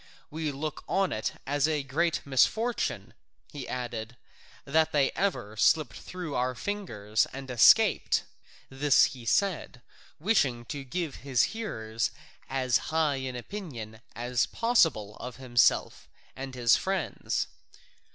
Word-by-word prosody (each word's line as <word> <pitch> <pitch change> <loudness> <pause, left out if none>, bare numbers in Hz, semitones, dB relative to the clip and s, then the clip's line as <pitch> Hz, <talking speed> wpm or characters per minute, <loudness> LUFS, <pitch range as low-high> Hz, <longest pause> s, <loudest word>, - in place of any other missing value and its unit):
We 155 0 -2
look 150 +2 -5
on 195 -1 +1
it 110 - -2
as 145 +1 +1
a 150 -3 0
great 165 +5 0
misfortune," 220 - +1 0.4
he 140 -4 -7
added, 120 -1 -5 0.5
"that 160 +3 +2
they 140 -2 +2
ever 165 - -2
slipped 120 +2 +3
through 180 -5 -7
our 125 0 0
fingers 115 - -1
and 135 -1 -7
escaped." 120 - +5 0.4
(This 135 +1 +4
he 125 -3 -11
said, 160 - 0 0.4
wishing 140 - +1
to 140 +3 -5
give 155 +2 -4
his 130 -4 +1
hearers 110 - -2 0.4
as 130 -2 +1
high 155 -3 +1
an 130 -1 -4
opinion 120 - -7
as 120 -1 0
possible 165 - +2
of 125 0 -7
himself 125 -2 +2 0.3
and 135 -1 -7
his 120 -2 +4
friends.) 190 -3 -1
135 Hz, 125 wpm, -28 LUFS, 120-160 Hz, 0.5 s, escaped